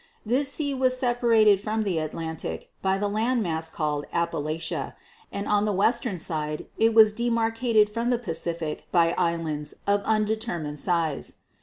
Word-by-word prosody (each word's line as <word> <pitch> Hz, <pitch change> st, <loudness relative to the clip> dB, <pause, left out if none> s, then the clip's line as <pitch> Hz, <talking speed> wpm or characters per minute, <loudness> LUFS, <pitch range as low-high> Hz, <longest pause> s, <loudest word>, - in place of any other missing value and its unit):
This 265 Hz, +5 st, +1 dB
sea 285 Hz, -1 st, -1 dB
was 255 Hz, -1 st, +1 dB
separated 230 Hz, -5 st, +3 dB
from 220 Hz, +1 st, -1 dB
the 185 Hz, -6 st, 0 dB
Atlantic 155 Hz, -, -5 dB
by 190 Hz, 0 st, +1 dB
the 205 Hz, +1 st, -1 dB
land 225 Hz, +3 st, 0 dB
mass 160 Hz, -2 st, -2 dB
called 150 Hz, -2 st, -2 dB
Appalachia, 165 Hz, -1 st, -2 dB, 0.4 s
and 200 Hz, -, -4 dB
on 210 Hz, 0 st, +2 dB
the 210 Hz, -, +1 dB
western 215 Hz, +1 st, +1 dB
side 155 Hz, -2 st, -3 dB
it 225 Hz, 0 st, +3 dB
was 215 Hz, -2 st, +7 dB
demarcated 230 Hz, -1 st, +2 dB
from 230 Hz, +3 st, -2 dB
the 245 Hz, -, +2 dB
Pacific 165 Hz, -6 st, -4 dB
by 170 Hz, -1 st, +3 dB
islands 160 Hz, -3 st, -1 dB
of 200 Hz, 0 st, +2 dB
undetermined 215 Hz, -8 st, -1 dB
size. 165 Hz, -4 st, -1 dB
205 Hz, 150 wpm, -26 LUFS, 165-230 Hz, 0.4 s, was